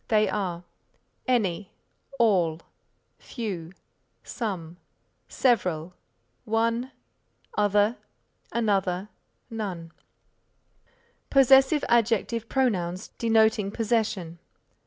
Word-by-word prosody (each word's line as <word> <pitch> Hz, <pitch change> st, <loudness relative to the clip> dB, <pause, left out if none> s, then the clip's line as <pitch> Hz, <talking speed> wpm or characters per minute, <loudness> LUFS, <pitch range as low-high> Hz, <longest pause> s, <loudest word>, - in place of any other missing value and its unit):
They 215 Hz, -1 st, +3 dB
are 180 Hz, -4 st, -3 dB, 0.6 s
any, 210 Hz, -6 st, 0 dB, 0.5 s
all, 180 Hz, -9 st, +2 dB, 0.6 s
few, 190 Hz, -9 st, -5 dB, 0.5 s
some, 180 Hz, -8 st, -5 dB, 0.5 s
several, 180 Hz, -9 st, 0 dB, 0.5 s
one, 230 Hz, +3 st, 0 dB, 0.6 s
other, 210 Hz, +2 st, +2 dB, 0.5 s
another, 200 Hz, -4 st, 0 dB, 0.4 s
none. 185 Hz, -7 st, -5 dB, 1.4 s
Possessive 270 Hz, +2 st, +5 dB
Adjective 230 Hz, -1 st, +1 dB
Pronouns 190 Hz, -8 st, 0 dB
denoting 220 Hz, -3 st, +3 dB
possession. 210 Hz, -6 st, -1 dB
210 Hz, 65 wpm, -26 LUFS, 180-230 Hz, 1.4 s, Possessive